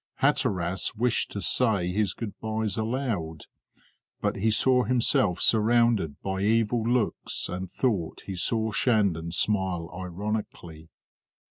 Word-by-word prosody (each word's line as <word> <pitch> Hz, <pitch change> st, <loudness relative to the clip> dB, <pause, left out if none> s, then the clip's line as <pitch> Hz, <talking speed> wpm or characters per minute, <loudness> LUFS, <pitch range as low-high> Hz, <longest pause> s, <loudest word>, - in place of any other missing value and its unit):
Hatteras 90 Hz, +2 st, 0 dB
wished 120 Hz, +2 st, 0 dB
to 100 Hz, -, -5 dB
say 105 Hz, -9 st, +2 dB
his 100 Hz, 0 st, 0 dB
good 110 Hz, -4 st, -5 dB
byes 110 Hz, -1 st, -2 dB
aloud, 110 Hz, -, -3 dB, 0.8 s
but -, -, -1 dB
he 110 Hz, +3 st, +1 dB
saw 125 Hz, +3 st, +3 dB
himself 110 Hz, -6 st, +2 dB
surrounded 115 Hz, -7 st, +3 dB
by 95 Hz, 0 st, -2 dB
evil 115 Hz, +2 st, +2 dB
looks 120 Hz, 0 st, -1 dB
and 90 Hz, +1 st, -5 dB
thought 100 Hz, -8 st, -2 dB
he 95 Hz, -, -5 dB
saw 110 Hz, +4 st, 0 dB
Shandon 100 Hz, -9 st, +1 dB
smile 95 Hz, -3 st, 0 dB
ironically. 90 Hz, -3 st, -5 dB
105 Hz, 120 wpm, -26 LUFS, 90-115 Hz, 0.8 s, saw